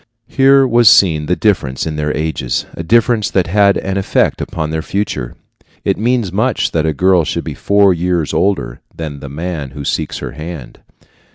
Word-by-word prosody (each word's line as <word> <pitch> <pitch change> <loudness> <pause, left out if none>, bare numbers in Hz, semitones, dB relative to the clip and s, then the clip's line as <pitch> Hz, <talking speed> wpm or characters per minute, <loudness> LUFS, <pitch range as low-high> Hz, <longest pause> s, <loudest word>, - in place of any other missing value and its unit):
Here 135 0 +4
was 120 -3 +5
seen 80 -7 +4
the 90 - +1
difference 80 -13 0
in 80 -1 -3
their 75 0 -1
ages 75 -5 -2
a - - -6
difference 115 +4 +2
that 95 -2 +1
had 100 +2 +3
an 95 0 -3
effect 95 - 0
upon 80 -2 -4
their 80 0 -2
future. 80 -12 -3 0.5
It - - +2
means 115 -3 0
much 110 +6 0
that 80 -1 0
a - - +2
girl 90 +2 +3
should - - -3
be - - -5
four 100 -1 +3
years 85 -2 -1
older 95 -11 -1
than 75 -3 -6
the 70 - -8
man 80 -1 -5
who 70 - -6
seeks - - -2
her - - -6
hand. 75 -2 -9
90 Hz, 185 wpm, -15 LUFS, 75-100 Hz, 0.5 s, was